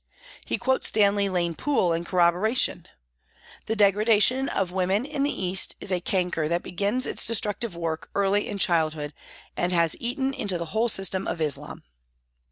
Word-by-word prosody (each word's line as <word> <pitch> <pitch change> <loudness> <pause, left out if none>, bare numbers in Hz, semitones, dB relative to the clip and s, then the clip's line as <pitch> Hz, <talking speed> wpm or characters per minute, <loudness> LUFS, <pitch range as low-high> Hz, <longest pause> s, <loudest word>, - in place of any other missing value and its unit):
He - - -1
quotes 260 -1 +1
Stanley 200 -1 +2
Lane 175 -2 -1
Poole 185 - +1
in 165 +1 -3
corroboration: 180 +7 +1 0.4
" - - -24
The 220 - -1
degradation 215 +5 +3
of 185 -2 -2
women 190 +5 0
in 290 -1 -4
the 285 - +1 0.2
East 185 +1 +2
is 195 - -4
a 180 - +1
canker 180 -4 -1
that 170 +2 -1
begins 205 +8 -1
its - - +1
destructive 215 -2 0
work 165 -2 -4
early 200 +1 +1
in 205 - -4
childhood, 155 -5 0 0.4
and 175 - -1
has 170 -3 +3
eaten 265 +3 -2
into 200 -8 -3
the 170 - -4
whole 230 +2 +1
system 195 -2 0
of - - -3
Islam." 150 -3 -3
195 Hz, 170 wpm, -25 LUFS, 175-220 Hz, 0.4 s, degradation